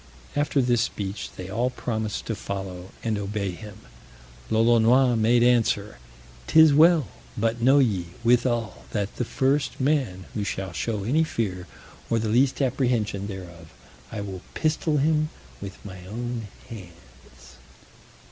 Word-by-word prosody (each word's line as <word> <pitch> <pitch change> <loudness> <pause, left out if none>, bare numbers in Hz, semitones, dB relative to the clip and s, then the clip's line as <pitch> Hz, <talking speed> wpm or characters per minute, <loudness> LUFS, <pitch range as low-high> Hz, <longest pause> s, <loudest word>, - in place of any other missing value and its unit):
After 145 -2 +1
this 120 -2 +2
speech, 100 -3 -3
they 90 - -7
all 115 +6 0
promised 110 -4 -3
to 115 - -2
follow, 95 -3 -6
and 110 -3 -1
obey 100 -1 -2
him. 105 +3 -11 0.7
Lolonois 120 +3 +4
made 115 +2 +3
answer, 110 - +2 0.5
"'Tis 160 -2 +7
well; 160 -2 +5 0.3
but 115 +2 0
know 135 +4 +5
ye, 105 -11 +2 0.2
withal, 120 -1 +1
that 100 -2 -2
the - - 0
first 135 +4 0
man 130 -10 0
who 105 - -2
shall 95 -2 -3
show 105 +3 -2
any 145 +10 +2
fear, 95 - -3 0.4
or 115 - +2
the 110 -1 -1
least 130 +5 +2
apprehension 120 -6 0
thereof, 85 -5 -9 0.4
I 110 - -4
will 95 -3 -6
pistol 155 -1 0
him 155 +1 +2 0.3
with 100 -1 -7
my 95 -2 -9
own 120 +1 -4 0.2
hands." 85 - -14
115 Hz, 140 wpm, -25 LUFS, 100-125 Hz, 0.7 s, Tis